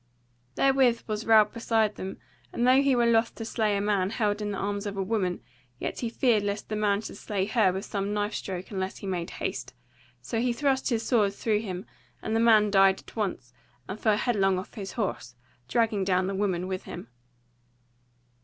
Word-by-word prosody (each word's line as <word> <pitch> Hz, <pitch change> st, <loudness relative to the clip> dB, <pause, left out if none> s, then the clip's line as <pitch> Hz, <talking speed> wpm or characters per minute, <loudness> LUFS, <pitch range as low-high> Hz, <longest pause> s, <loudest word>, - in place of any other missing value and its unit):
Therewith 265 Hz, -4 st, +3 dB
was 215 Hz, 0 st, -4 dB
Ralph 215 Hz, -2 st, +6 dB
beside 225 Hz, -2 st, +1 dB
them, 190 Hz, -1 st, -6 dB, 0.3 s
and 240 Hz, -, 0 dB
though 260 Hz, +2 st, +6 dB
he 275 Hz, -2 st, +3 dB
were 240 Hz, -1 st, +3 dB
loth 230 Hz, 0 st, +2 dB
to 225 Hz, -, -6 dB
slay 215 Hz, -3 st, 0 dB
a -, -, -1 dB
man 200 Hz, -2 st, +1 dB
held 210 Hz, -1 st, -1 dB
in 210 Hz, -, -2 dB
the 200 Hz, -, -3 dB
arms 205 Hz, +1 st, -2 dB
of 200 Hz, -1 st, -5 dB
a 195 Hz, -, 0 dB
woman, 185 Hz, -3 st, -1 dB, 0.3 s
yet -, -, -4 dB
he 235 Hz, -, -2 dB
feared 230 Hz, -2 st, +2 dB
lest 205 Hz, +1 st, -3 dB
the 215 Hz, -, -2 dB
man 205 Hz, -1 st, +1 dB
should -, -, -8 dB
slay 200 Hz, -3 st, -2 dB
her 215 Hz, -3 st, +3 dB
with 190 Hz, +3 st, -4 dB
some 200 Hz, 0 st, -3 dB
knife 210 Hz, +1 st, -1 dB
stroke 185 Hz, -1 st, -5 dB
unless 190 Hz, -1 st, -3 dB
he -, -, -9 dB
made 180 Hz, -3 st, -3 dB
haste; -, -, -5 dB, 0.4 s
so 225 Hz, -, -3 dB
he 245 Hz, +1 st, +1 dB
thrust 265 Hz, +1 st, 0 dB
his 230 Hz, -3 st, 0 dB
sword 210 Hz, -5 st, +2 dB
through 215 Hz, -1 st, 0 dB
him, 190 Hz, -3 st, -5 dB, 0.3 s
and 220 Hz, -, -3 dB
the -, -, +3 dB
man 215 Hz, -3 st, +5 dB
died 195 Hz, -1 st, +5 dB
at -, -, -16 dB
once, 180 Hz, -, -3 dB, 0.3 s
and 200 Hz, +3 st, -6 dB
fell 215 Hz, -2 st, +2 dB
headlong 195 Hz, -6 st, +2 dB
off 185 Hz, -, -7 dB
his 195 Hz, -3 st, -6 dB
horse, 190 Hz, -, -3 dB, 0.3 s
dragging 220 Hz, -, +1 dB
down 185 Hz, -1 st, +2 dB
the 195 Hz, -, -2 dB
woman 190 Hz, -3 st, -1 dB
with 185 Hz, -1 st, -4 dB
him. -, -, -8 dB
210 Hz, 205 wpm, -27 LUFS, 195-225 Hz, 0.4 s, Ralph